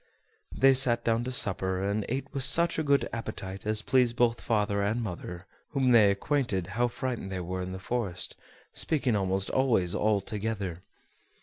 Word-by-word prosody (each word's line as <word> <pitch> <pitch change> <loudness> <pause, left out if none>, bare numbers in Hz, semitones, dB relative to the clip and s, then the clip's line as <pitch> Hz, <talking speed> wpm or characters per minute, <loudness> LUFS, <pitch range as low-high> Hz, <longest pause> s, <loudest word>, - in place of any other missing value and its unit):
They 135 0 +6
sat 120 -3 +5
down 115 0 +1
to 130 - -3
supper, 95 -6 +1
and 100 +1 -2
ate 130 +3 -2
with 135 - -2
such 170 +5 +4
a - - 0
good 140 -1 +2
appetite 100 -3 -6
as 110 0 0
pleased 125 -2 +2
both 120 -1 +1
father 105 -2 0
and 105 +4 0
mother, 90 -4 -6 0.3
whom 135 -3 +2
they 110 -4 +6
acquainted 100 - -1
how 120 +3 +1
frightened 120 -4 -4
they 95 - -3
were 90 +1 -4
in 90 0 -5
the 95 - -5
forest, 95 -2 -4 0.4
speaking 135 -7 0
almost 95 -1 -1
always 115 -10 +1
all 105 -1 +1
together. 100 -3 -4
110 Hz, 175 wpm, -28 LUFS, 95-125 Hz, 0.4 s, They